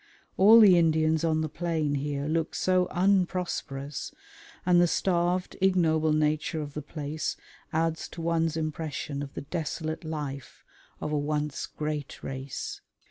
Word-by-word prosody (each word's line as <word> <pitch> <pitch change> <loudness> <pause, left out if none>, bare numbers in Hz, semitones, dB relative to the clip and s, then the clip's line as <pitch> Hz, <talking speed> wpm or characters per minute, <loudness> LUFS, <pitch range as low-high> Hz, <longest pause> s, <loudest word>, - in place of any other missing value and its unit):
All 215 +4 +8
the 190 -5 +8
Indians 160 -1 +2
on 160 -1 +2
the 155 - -1
plain 160 -2 -1
here 140 0 -2
look 160 +1 -1
so 185 -1 +2
unprosperous, 175 -7 -1 0.5
and 175 -1 +5
the 175 - +5
starved, 180 +1 0
ignoble 160 -5 +3
nature 155 +1 +1
of 145 -2 -5
the 150 - -4
place 150 +1 -4 0.3
adds 160 0 0
to 165 - -8
one's 165 -1 +1
impression 155 -2 -3
of 140 -1 -7
the - - -4
desolate 160 +1 -4
life 145 -4 -6 0.4
of 150 - -3
a 150 - +1
once 150 0 -2
great 150 -2 -5
race. 135 0 -5
155 Hz, 140 wpm, -28 LUFS, 150-170 Hz, 0.5 s, All